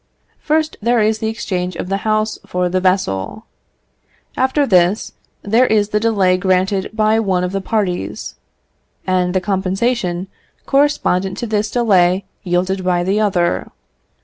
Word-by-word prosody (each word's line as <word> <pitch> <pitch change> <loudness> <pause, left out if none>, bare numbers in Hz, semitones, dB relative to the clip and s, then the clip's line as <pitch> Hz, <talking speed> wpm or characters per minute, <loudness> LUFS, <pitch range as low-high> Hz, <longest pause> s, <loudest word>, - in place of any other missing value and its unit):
First, 310 0 0
there 235 +2 +2
is 220 0 +1
the 220 - -2
exchange 185 -5 -3
of 180 - -5
the 195 +1 -1
house 215 +1 -1
for 180 0 -1
the 185 +1 0
vessel; 185 - -1 0.9
after 265 +3 +1
this, 185 -1 +2 0.3
there 230 +5 +3
is 210 -1 +2
the 210 - +1
delay 200 -5 +2
granted 185 +1 0
by 220 0 +2
one 190 -4 0
of 180 - -2
the 195 0 -2
parties, 195 -3 -2 0.7
and 185 -1 0
the - - +4
compensation 190 0 -1 0.4
correspondent 195 -10 +1
to - - -3
this 215 -1 -1
delay 190 -5 +2 0.2
yielded 185 +1 -1
by 180 -1 +1
the 195 +4 +1
other. 180 -5 +1
195 Hz, 145 wpm, -18 LUFS, 185-220 Hz, 0.9 s, the